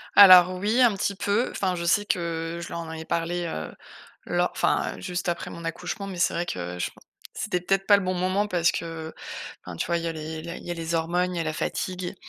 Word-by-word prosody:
Alors 185 -2 +9
oui, 215 +6 +2
un 240 -3 +6
petit 200 +1 -1
peu. 205 +5 +1
Enfin, 185 -2 -1
je 170 -1 -4
sais 205 +4 +3
que 170 -2 -2
je - - -6
leur - - -4
en 165 -1 -6
avais 160 0 -6
parlé, 170 +1 -1
heu, 80 - -5 0.5
lo - - +1
enfin, - - 0
heu, - - -11
juste 175 - -2
après 170 0 -3
mon 170 - -9
accouchement, 180 +4 -4
mais 195 -2 -6
c'est 175 - +2
vrai 170 +1 -1
que 90 - -4
je 90 - -1
pen - - -21 0.3
c'était 180 - -2
peut-être 195 +2 0
pas 205 - +8
le 200 - +1
bon 185 0 0
moment 185 +3 +1
parce 170 -3 +2
que, 165 -1 -5 0.5
enfin, 90 -2 -7
tu - - -2
vois, 170 0 +1
il 165 - -5
y - - -1
a 165 - -1
les 155 0 -6
la 170 +1 -6
il - - -13
y 175 - -6
a - - -1
les 165 0 -3
hormones, 175 +2 0
il - - -2
y - - 0
a 165 - -1
la 155 - -1
fatigue 180 +3 -3
175 Hz, 265 wpm, -26 LUFS, 165-185 Hz, 0.5 s, Alors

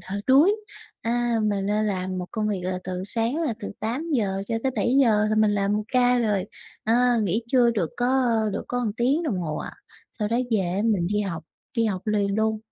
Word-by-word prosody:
hơi 200 +1 -2
đuối. 300 +11 +5 0.5
À, 240 0 0
mình 200 -2 0
đang 210 +1 +1
làm 185 -2 -2
một 180 - -4
công 215 -2 -1
việc 200 -3 -1
là 185 0 -2
từ 185 0 -4
sáng 230 +6 0
là 280 -8 -1
từ - - -5
8:00 225 -5 -1
cho 230 - -1
tới 265 - 0
7:00 230 -2 +3
là - - +2
mình 215 -1 +4
làm 200 0 +1
một 210 - -1
ca 250 0 +3
rồi, 210 -5 +1 0.4
ờ, 220 - +2 0.3
nghỉ 210 +3 0
trưa 240 -1 +4
được 195 -9 -1
có 255 +2 +2 0.3
được 200 - -4
có 245 - -1
một 230 -4 -1
tiếng 270 +7 +2
đồng 255 - -1
hồ 155 -4 -3
à. - - -5 0.4
Sau 210 -3 -3
đó 230 - 0
về 220 -3 +2
á, 185 +2 -1
mình 205 -7 +1
đi 205 +3 0
học 185 -6 -4 0.3
đi 230 - +3
học 195 -2 -2
liền 205 -2 +1
luôn. 220 0 +1
215 Hz, 220 wpm, -24 LUFS, 195-240 Hz, 0.5 s, đuối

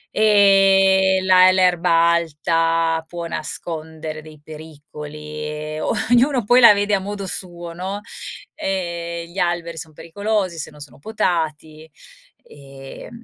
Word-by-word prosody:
ehm, 195 -2 +4
la 185 0 +6
l'erba 175 -2 +3
alta 165 0 0
può 170 +1 -7
nascondere 160 -1 -5
dei 155 -1 -15
pericoli 150 -1 -11 0.3
e 155 0 -6
ognuno 245 +1 +1
poi 245 +4 +5
la 230 - +9
vede 205 0 -1
a 195 - 0
modo 200 +1 -6
suo, 175 -2 -4
no. 190 +4 -5 0.5
Ehm, 170 -2 -4
gli 195 - -7
alberi 175 -2 -2
son 160 -1 -9
pericolosi 185 +3 -3
se - - -5
non 150 - -17
sono 140 -2 -13
potati 160 -5 -3 0.6
e 135 -1 -12
170 Hz, 120 wpm, -20 LUFS, 155-190 Hz, 0.6 s, la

